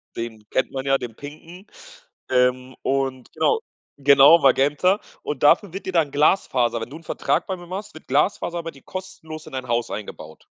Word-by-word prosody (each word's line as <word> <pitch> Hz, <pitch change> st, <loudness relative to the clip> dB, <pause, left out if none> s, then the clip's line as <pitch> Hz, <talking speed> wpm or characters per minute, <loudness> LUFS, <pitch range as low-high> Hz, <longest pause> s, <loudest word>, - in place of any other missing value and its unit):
den 110 Hz, -2 st, -6 dB
kennt 130 Hz, -, 0 dB
man 135 Hz, 0 st, -4 dB
ja, 135 Hz, 0 st, +3 dB
den 120 Hz, -4 st, -7 dB
pinken, 165 Hz, +6 st, -11 dB, 0.6 s
ähm, 125 Hz, 0 st, +1 dB
und 135 Hz, -1 st, -1 dB
genau. 450 Hz, -, +2 dB, 0.4 s
Genau, 140 Hz, +4 st, +7 dB
Magenta. 145 Hz, +9 st, +3 dB, 0.2 s
Und 145 Hz, -1 st, -4 dB
dafür 170 Hz, +5 st, +5 dB
wird 195 Hz, -, -6 dB
dir 185 Hz, -, -3 dB
dann 160 Hz, -4 st, +2 dB
Glasfaser 130 Hz, -6 st, +2 dB
wenn 115 Hz, -, -5 dB
du 145 Hz, -, -10 dB
'n 165 Hz, -, -16 dB
Vertrag -, -, -1 dB
bei 190 Hz, -, -2 dB
mir 175 Hz, 0 st, -12 dB
machst, 195 Hz, +3 st, -6 dB
wird 155 Hz, -, -13 dB
Glasfaser 170 Hz, +4 st, 0 dB
bei 165 Hz, -, -5 dB
dir 135 Hz, -, -18 dB
kostenlos 185 Hz, -5 st, -8 dB
in -, -, -12 dB
dein 130 Hz, -1 st, -5 dB
Haus 120 Hz, 0 st, -1 dB
eingebaut. 80 Hz, -6 st, -8 dB
140 Hz, 185 wpm, -23 LUFS, 130-170 Hz, 0.6 s, Genau